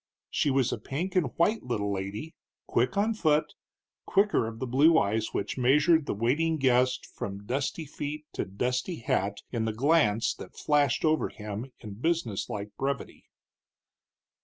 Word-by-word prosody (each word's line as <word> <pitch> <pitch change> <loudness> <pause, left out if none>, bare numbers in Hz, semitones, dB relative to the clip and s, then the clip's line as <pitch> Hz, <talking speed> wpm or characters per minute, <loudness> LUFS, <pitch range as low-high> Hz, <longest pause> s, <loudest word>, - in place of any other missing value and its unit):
She 145 - +1
was 135 -2 +2
a - - -4
pink 165 - -4
and 180 -6 +3
white 210 +7 +2
little 105 -5 -2
lady, 100 +11 -5 0.3
quick 125 - 0
on 215 +3 +2
foot, 155 -7 +1 0.5
quicker 200 - +3
of 115 0 -7
the 130 - -3
blue 145 +6 +5
eyes 110 -2 +1
which - - -3
measured 150 +5 +4
the - - -1
waiting 150 +9 +1
guest 130 -2 +2
from 100 0 -7
dusty 140 +6 -2
feet 150 +1 -5
to - - -1
dusty 125 - -2
hat 100 -5 -1
in 115 -2 -1
the 110 - -1
glance 120 -4 +3
that - - -11
flashed 145 -3 +2
over 155 0 +2
him 105 +4 -6
in 105 -3 -7
business 160 - -1
like 105 0 -5
brevity. 135 -1 -3
130 Hz, 160 wpm, -28 LUFS, 110-155 Hz, 0.5 s, blue